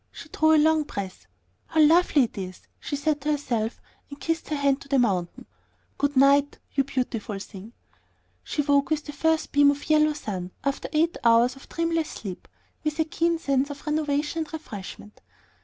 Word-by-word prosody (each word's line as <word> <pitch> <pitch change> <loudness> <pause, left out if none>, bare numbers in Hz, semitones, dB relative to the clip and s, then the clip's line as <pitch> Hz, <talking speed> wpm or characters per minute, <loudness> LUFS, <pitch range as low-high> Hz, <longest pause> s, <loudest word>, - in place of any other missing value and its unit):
She 320 - -11
drew 315 +1 +3
a - - +5
long 315 +1 +4
breath. 190 - -6 0.4
"How 320 - -1
lovely 315 -2 +5
it 235 - -4
is!" 185 -2 -6 0.2
she 285 - -4
said 295 0 -1
to 295 - -2
herself, 235 -6 -2 0.3
and 285 0 -10
kissed 330 +2 -2
her 305 - -1
hand 280 -1 +1
to - - -12
the 275 -1 +2
mountain. 190 -8 0 0.5
"Good 285 -1 0
night, 280 +1 +4 0.2
you 275 - +2
beautiful 245 -6 -3
thing." 195 +2 -10 0.7
She 295 - -2
woke 280 0 +2
with 310 -1 -1
the 295 - -7
first 320 +2 0
beam 285 0 +5
of 285 +2 -2
yellow 305 0 +4
sun, 185 -10 -5
after 275 0 -2
eight 325 +2 +1
hours 235 +2 +4
of 270 - -15
dreamless 330 -1 -1
sleep, 190 -4 -8 0.4
with 305 -1 -2
a 320 - +3
keen 335 +1 0
sense 275 -3 0
of 285 0 -9
renovation 300 +1 -1
and 315 -2 -4
refreshment. 210 -8 -9
285 Hz, 185 wpm, -25 LUFS, 240-310 Hz, 0.7 s, a